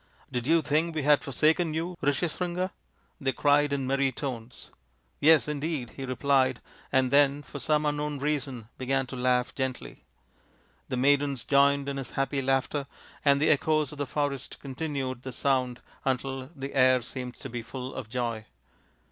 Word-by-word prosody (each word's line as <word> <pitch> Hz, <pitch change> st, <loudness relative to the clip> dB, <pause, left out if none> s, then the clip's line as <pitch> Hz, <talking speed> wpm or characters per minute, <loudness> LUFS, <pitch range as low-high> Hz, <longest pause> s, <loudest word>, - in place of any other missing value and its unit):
" -, -, -30 dB
Did 125 Hz, 0 st, -2 dB
you 165 Hz, 0 st, +4 dB
think 160 Hz, +3 st, +1 dB
we 155 Hz, -, -1 dB
had 150 Hz, 0 st, +4 dB
forsaken 155 Hz, +4 st, +2 dB
you, 170 Hz, +3 st, -2 dB
Rishyas 145 Hz, +3 st, 0 dB
ringa? 180 Hz, +1 st, -1 dB, 0.2 s
" -, -, -37 dB
they 135 Hz, -1 st, +1 dB
cried 145 Hz, +2 st, +3 dB
in 140 Hz, -2 st, -1 dB
merry 135 Hz, +1 st, +1 dB
tones. 125 Hz, -3 st, -6 dB, 0.2 s
" 65 Hz, -, -42 dB
Yes, 155 Hz, 0 st, +6 dB
indeed, 150 Hz, -4 st, -2 dB
55 -, -, -20 dB
he 135 Hz, -, -4 dB
replied, 130 Hz, -1 st, +2 dB, 0.3 s
and 130 Hz, -1 st, +3 dB
then 145 Hz, 0 st, +4 dB
for 145 Hz, -, -8 dB
some 150 Hz, +1 st, +1 dB
unknown 150 Hz, 0 st, -1 dB
reason 135 Hz, -5 st, -2 dB
began 135 Hz, +1 st, 0 dB
to 130 Hz, -, -8 dB
laugh 125 Hz, 0 st, +1 dB
gently. 130 Hz, -1 st, -4 dB, 0.9 s
The 130 Hz, -, -1 dB
maidens 140 Hz, 0 st, +2 dB
joined 140 Hz, 0 st, +4 dB
in 140 Hz, 0 st, -2 dB
his 135 Hz, -, -6 dB
happy 135 Hz, 0 st, 0 dB
laughter, 135 Hz, +1 st, 0 dB, 0.4 s
and 140 Hz, -1 st, +5 dB
the 155 Hz, -, +4 dB
echoes 155 Hz, -1 st, +2 dB
of 150 Hz, -, -10 dB
the 145 Hz, -, -1 dB
forest 140 Hz, -1 st, -2 dB
continued 135 Hz, -2 st, -4 dB
the 130 Hz, -, -6 dB
sound 130 Hz, -1 st, 0 dB, 0.2 s
until 135 Hz, 0 st, -2 dB
the 135 Hz, 0 st, -6 dB
air 130 Hz, -2 st, +4 dB
seemed 125 Hz, 0 st, -6 dB
to -, -, -8 dB
be 120 Hz, -1 st, -4 dB
full 130 Hz, +3 st, -7 dB
of 125 Hz, -5 st, -6 dB
joy. 115 Hz, -3 st, -3 dB
135 Hz, 180 wpm, -28 LUFS, 130-145 Hz, 0.9 s, Yes